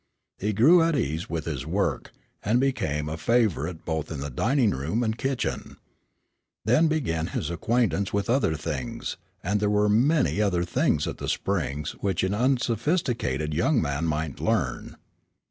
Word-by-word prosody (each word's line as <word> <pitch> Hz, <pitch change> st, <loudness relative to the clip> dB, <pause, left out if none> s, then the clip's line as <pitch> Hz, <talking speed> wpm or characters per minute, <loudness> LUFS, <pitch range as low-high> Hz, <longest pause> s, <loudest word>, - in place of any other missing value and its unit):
He 105 Hz, +2 st, 0 dB
grew 145 Hz, -, +6 dB
at 165 Hz, -1 st, +2 dB
ease 80 Hz, -, -2 dB
with 80 Hz, -1 st, -3 dB
his 75 Hz, -7 st, -3 dB
work, -, -, -1 dB, 0.3 s
and 110 Hz, +4 st, +2 dB
became 75 Hz, -, 0 dB
a 80 Hz, +2 st, -4 dB
favorite 90 Hz, -, 0 dB
both 80 Hz, -2 st, -3 dB
in 75 Hz, -, -4 dB
dining 120 Hz, -, +2 dB
room 80 Hz, -, -1 dB
and 110 Hz, -1 st, 0 dB
kitchen. 135 Hz, +2 st, -3 dB, 0.9 s
Then 125 Hz, +9 st, +4 dB
began 110 Hz, -, -1 dB
his 85 Hz, -3 st, -3 dB
acquaintance 100 Hz, 0 st, 0 dB
with 100 Hz, +2 st, -1 dB
other 120 Hz, -, +2 dB
things, 75 Hz, -4 st, -4 dB, 0.3 s
and 105 Hz, +4 st, 0 dB
there 105 Hz, 0 st, +1 dB
were 105 Hz, 0 st, +3 dB
many 130 Hz, +1 st, +3 dB
other 90 Hz, -4 st, +1 dB
things 85 Hz, -, +1 dB
at -, -, -5 dB
the -, -, -3 dB
Springs 70 Hz, +3 st, -1 dB
which 95 Hz, -3 st, 0 dB
an 95 Hz, +1 st, 0 dB
unsophisticated 120 Hz, -, 0 dB
young 115 Hz, -, +2 dB
man 70 Hz, +1 st, -1 dB
might 80 Hz, -3 st, -2 dB
learn. -, -, -1 dB
100 Hz, 155 wpm, -26 LUFS, 80-120 Hz, 0.9 s, grew